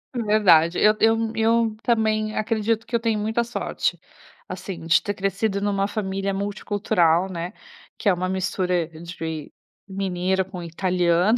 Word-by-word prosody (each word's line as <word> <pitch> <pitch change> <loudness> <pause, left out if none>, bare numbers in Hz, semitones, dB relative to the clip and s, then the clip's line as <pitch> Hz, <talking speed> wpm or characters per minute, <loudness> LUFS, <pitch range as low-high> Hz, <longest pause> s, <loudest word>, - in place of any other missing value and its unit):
Verdade, 200 -7 +4
eu 215 0 +5
eu 225 0 +2
eu 225 0 +2
também 215 -2 +1
acredito 225 +1 0
que 235 - -2
eu - - +3
tenho 225 -2 0
muita 220 +3 0
sorte, 235 - -2 0.5
assim, 185 -4 -7
de 165 - +5
ter 205 - -2
crescido 195 +1 -1
numa 200 -1 0
família 195 -1 -2
multicultural, 195 -3 +1
né, 175 +1 -5 0.4
que - - -4
é - - +5
uma 180 +1 -2
mistura 180 -2 0
de 160 -2 -7 0.4
mineiro 190 -1 -1
com 185 -2 -8
italiano. 180 +4 +2
195 Hz, 140 wpm, -23 LUFS, 180-215 Hz, 0.5 s, eu